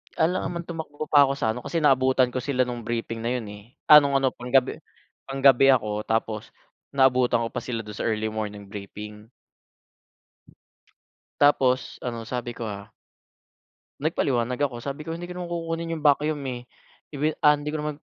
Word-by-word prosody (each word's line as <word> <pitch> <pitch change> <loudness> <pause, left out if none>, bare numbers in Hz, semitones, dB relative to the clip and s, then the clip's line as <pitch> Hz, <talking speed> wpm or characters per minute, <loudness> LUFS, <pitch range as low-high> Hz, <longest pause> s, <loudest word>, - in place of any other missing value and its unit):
"Alangan 175 +3 +1
naman 170 0 -4
tumakbo 155 -3 -6
pa 145 -1 +7
ako 135 - -1
sa 130 -5 -1
ano." 125 +1 -8
kasi 165 - -1
naabutan 130 -3 +3
ko 125 - -5
sila 135 -2 0
nung 120 -2 -6
briefing 115 0 -3
na 120 - 0
'yon, 125 -3 -3
eh 105 0 -10 0.3
ah, 150 - +12
nung 140 -1 +4
ano 135 -1 +3
panggabi 125 +1 +1 0.5
panggabi 135 0 +5
ako 105 -3 -1
tapos 110 -1 -2 0.4
naabutan 130 -3 +3
ko 115 - -2
pa 125 - -4
sila 115 -3 -3
don 105 -1 -10
sa - - -3
early 110 -1 0
morning 105 -2 -5
briefing. 105 +1 -9 2.1
Tapos 135 -3 +2
ano 115 -2 -5
sabi 120 0 -5
ko, - - -6
ah 100 -2 -6 1.2
nagpaliwanag 125 -5 0
ako, 125 -5 -2
sabi 140 +2 -6
ko 165 - -3
"Hindi 175 +1 -7
ko 180 - -7
naman 175 -1 -5
kukunin 165 0 -3
yung 155 - -8
vacuum, 150 0 +2
eh, 120 -1 -6 0.5
ibi 150 +3 +1
ah, 150 -1 +6
hindi 145 +1 -5
ko 155 - -2
naman 150 0 -3
130 Hz, 175 wpm, -25 LUFS, 115-150 Hz, 2.1 s, ah